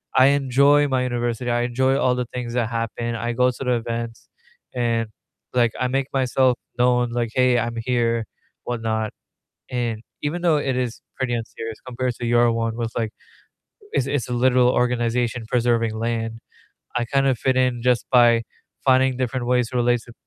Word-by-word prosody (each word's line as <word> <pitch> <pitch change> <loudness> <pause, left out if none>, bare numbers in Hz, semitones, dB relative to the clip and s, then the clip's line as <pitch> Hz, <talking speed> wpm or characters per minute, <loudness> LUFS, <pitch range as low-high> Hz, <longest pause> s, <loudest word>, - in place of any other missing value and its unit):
I 130 - +7
enjoy 140 +1 +4
my 130 -2 +1
university, 120 -1 -2
I 120 0 +1
enjoy 130 +2 +1
all 125 - +2
the 125 - -2
things 120 -1 -4
that 120 -2 0
happen, 115 0 -3
I 120 +1 -2
go 125 +1 +3
to 130 - -7
the 125 -1 +1
events, 115 -1 -4 0.5
and, 115 -2 0 0.4
like, 120 -2 +3
I 125 - +1
make 135 +1 -1
myself 130 -1 +2 0.2
known, 125 0 +3
like, 120 -1 -1
"Hey, 125 -1 +3
I'm 120 0 -2
here," 115 -2 0 0.4
whatnot, 110 -2 -2 0.6
and 120 -3 -2 0.2
even 155 +4 -2
though 165 -3 +4
it 135 -3 -1
is 125 -2 -3 0.2
pretty 130 -2 -1
unserious 115 -1 -5
compared 125 0 -2
to 120 - -5
your 120 0 +4
one 115 0 -1
with, 115 -1 -2
like 110 -2 -1 0.8
it's 130 - +1
it's 140 -4 -1
a - - -4
literal 125 0 +4
organization 120 -1 0
preserving 115 -2 +1
land, 115 0 -2 0.6
I 120 - +1
kind 135 +3 +1
of 130 -3 +2
fit 130 +2 +1
in 125 -2 +1
just 125 -1 +2
by 120 -2 +6 0.4
finding 130 -1 +4
different 125 -1 -2
ways 125 -2 +2
to 125 - -4
relate 120 -1 +2
to 120 - -12
120 Hz, 180 wpm, -22 LUFS, 115-130 Hz, 0.8 s, I